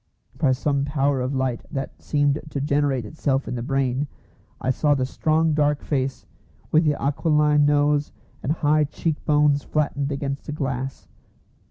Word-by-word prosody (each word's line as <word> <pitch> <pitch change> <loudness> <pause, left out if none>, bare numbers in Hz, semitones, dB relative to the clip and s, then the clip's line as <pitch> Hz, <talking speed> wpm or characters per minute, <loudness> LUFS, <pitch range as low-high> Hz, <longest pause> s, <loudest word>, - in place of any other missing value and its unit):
By 140 - +2
some 140 +1 0
power 140 -2 +1
of 130 +2 -2
light 130 -3 -1
that 135 -2 -5
seemed 145 -1 +1
to 145 - -3
generate 140 -3 +1
itself 135 +1 -1
in - - -3
the 120 - -3
brain, 135 +1 0 0.5
I 130 - 0
saw 145 +2 +2
the 130 -2 0
strong 155 +4 +1
dark 150 -1 +1
face 135 -2 -2 0.5
with 160 +1 +4
the 150 -1 +1
aquiline 150 0 +3
nose 145 0 +2 0.3
and 135 - -1
high 155 -1 +2
cheek 155 +2 -3
bones 145 -1 +3
flattened 145 -2 -1
against 140 0 -4
the 150 - -3
glass. 135 -2 -4
145 Hz, 160 wpm, -23 LUFS, 135-150 Hz, 0.5 s, with